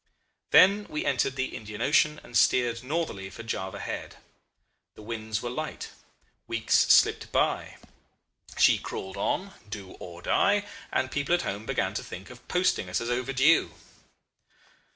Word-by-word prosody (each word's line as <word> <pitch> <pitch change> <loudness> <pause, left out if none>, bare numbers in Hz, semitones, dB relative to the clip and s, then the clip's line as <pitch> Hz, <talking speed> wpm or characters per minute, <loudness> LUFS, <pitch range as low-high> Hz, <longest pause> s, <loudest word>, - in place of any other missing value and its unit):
"Then 200 +3 +6
we 150 - -3
entered 135 0 +1
the 130 0 -3
Indian 105 -1 -8
Ocean 150 +1 +3
and 120 - -12
steered 120 -2 +3
northerly 130 - -3
for 115 - -10
Java 100 -3 -4
Head. - - -5 0.8
The 110 - -12
winds 110 0 -4
were 120 - -2
light. 155 +4 -5 0.6
Weeks - - -2
slipped - - +4
by. - - 0 0.8
She - - +5
crawled 95 0 -6
on, 195 +1 -2 0.2
do 100 -3 -7
or 85 -1 -10
die, 205 0 +2 0.3
and 130 - 0
people 145 +4 +1
at 175 - -2
home 105 +3 -4
began - - 0
to - - -3
think 95 +4 -9
of 125 0 -15
posting 180 - +1
us 90 - 0
as 115 +1 -3
overdue. 135 +5 +2
125 Hz, 150 wpm, -27 LUFS, 105-150 Hz, 0.8 s, Then